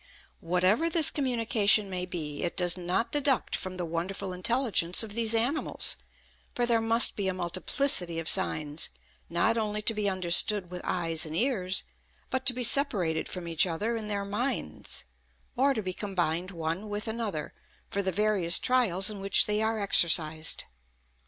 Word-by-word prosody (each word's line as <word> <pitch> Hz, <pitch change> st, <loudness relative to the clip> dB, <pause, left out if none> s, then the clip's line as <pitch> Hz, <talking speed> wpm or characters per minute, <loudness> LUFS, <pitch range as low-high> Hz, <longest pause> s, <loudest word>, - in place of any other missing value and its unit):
Whatever 185 Hz, -, +1 dB
this 325 Hz, -2 st, +5 dB
communication 225 Hz, -6 st, +1 dB
may 180 Hz, -1 st, -4 dB
be, 150 Hz, -5 st, -5 dB
it 175 Hz, -, -2 dB
does 175 Hz, -1 st, +3 dB
not 180 Hz, +5 st, -2 dB
deduct 285 Hz, -3 st, +1 dB
from 185 Hz, -1 st, -6 dB
the 175 Hz, -, -3 dB
wonderful 185 Hz, +3 st, -4 dB
intelligence 190 Hz, -2 st, +1 dB
of 215 Hz, -2 st, -8 dB
these 230 Hz, 0 st, +1 dB
animals; 250 Hz, +7 st, 0 dB, 0.6 s
for 245 Hz, -, +1 dB
there 230 Hz, -1 st, +2 dB
must 225 Hz, +1 st, +3 dB
be 200 Hz, -2 st, -2 dB
a 190 Hz, -, -1 dB
multiplicity 180 Hz, +1 st, +1 dB
of 165 Hz, -1 st, -4 dB
signs, 155 Hz, -5 st, +1 dB, 0.4 s
not 220 Hz, +7 st, +1 dB
only 210 Hz, -1 st, -2 dB
to 225 Hz, -, +2 dB
be 210 Hz, -2 st, -1 dB
understood 185 Hz, +1 st, +2 dB
with 180 Hz, 0 st, -6 dB
eyes 165 Hz, -3 st, -1 dB
and 155 Hz, 0 st, -5 dB
ears, 195 Hz, -4 st, -1 dB, 0.5 s
but 260 Hz, +1 st, -2 dB
to 255 Hz, -, +6 dB
be 250 Hz, 0 st, -3 dB
separated 205 Hz, -, +2 dB
from 180 Hz, -2 st, -6 dB
each 165 Hz, +2 st, +1 dB
other 210 Hz, +8 st, -2 dB
in 220 Hz, -2 st, -5 dB
their 200 Hz, -1 st, -3 dB
minds, 210 Hz, -, -4 dB, 0.5 s
or 275 Hz, +3 st, +3 dB
to 220 Hz, -6 st, -3 dB
be 185 Hz, -1 st, -4 dB
combined 180 Hz, -3 st, -2 dB
one 170 Hz, +3 st, -4 dB
with 205 Hz, +1 st, -4 dB
another, 220 Hz, -9 st, -4 dB, 0.4 s
for 200 Hz, -, -1 dB
the 190 Hz, -1 st, -1 dB
various 195 Hz, -4 st, +3 dB
trials 215 Hz, -7 st, +2 dB
in 210 Hz, -2 st, -2 dB
which 195 Hz, 0 st, +4 dB
they 210 Hz, 0 st, 0 dB
are 220 Hz, 0 st, -1 dB
exercised. 160 Hz, -5 st, +2 dB
195 Hz, 165 wpm, -28 LUFS, 175-225 Hz, 0.6 s, to